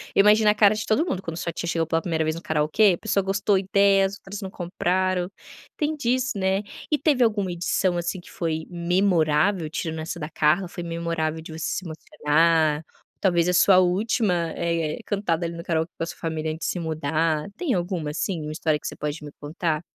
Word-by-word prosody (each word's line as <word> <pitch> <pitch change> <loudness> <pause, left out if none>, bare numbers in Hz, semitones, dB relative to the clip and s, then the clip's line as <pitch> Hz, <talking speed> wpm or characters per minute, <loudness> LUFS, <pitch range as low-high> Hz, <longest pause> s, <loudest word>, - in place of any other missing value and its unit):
Eu - - +7
imagino 210 +1 +5
a 210 - +3
cara 210 -1 +5
de 215 - -3
todo 285 +10 +2
mundo 195 - -2
quando 165 -2 -6
sua 170 -1 -3
tia 170 - -5
chegou 165 -1 0
pela 165 +1 0
1º 160 -3 -1
vez 155 +1 -1
no 165 - -7
karaokê, 160 +6 +3
a - - -13
pessoa 200 -3 0
gostou 195 +1 +1
ideias, 195 0 +3
outras 195 +1 -8
não 190 - -5
compraram, 180 0 -1 0.5
tem 305 +1 0
disso, 255 -4 0
né. 190 +1 +1 0.3
E 300 - +4
teve 275 -4 +3
alguma 205 -5 +1
edição, 175 +1 0
assim, 175 +2 -2
que - - -16
foi 160 -2 -2
memorável, 175 -1 +2
tirando 160 0 -4
essa 170 +2 -5
da 150 +1 -5
Carla, 160 +4 +2
foi 175 - -6
memorável 165 -1 -2
de 160 - -10
você 160 0 -5
se 185 - -3
emocionar, 155 0 +1 0.3
ou - - -51
talvez 175 -2 +2
a - - +2
sua 185 +1 +6
última, 180 -2 +1
eh, 165 -2 -1
cantada 175 -5 -1
ali 170 0 -4
no 170 - -7
karaokê 165 -2 -1
com - - -2
a - - 0
sua - - -8
família 160 -1 -3
antes 160 - -4
se 180 - -2
mudar? 155 0 0
Tem 340 -7 0
alguma, 175 -4 -2
assim, 165 +2 -2
uma 150 0 -5
história 155 -1 0
que - - -6
você - - -5
pode 150 +1 -4
me 145 - -8
contar? 155 +1 -2
170 Hz, 215 wpm, -24 LUFS, 160-195 Hz, 0.5 s, Eu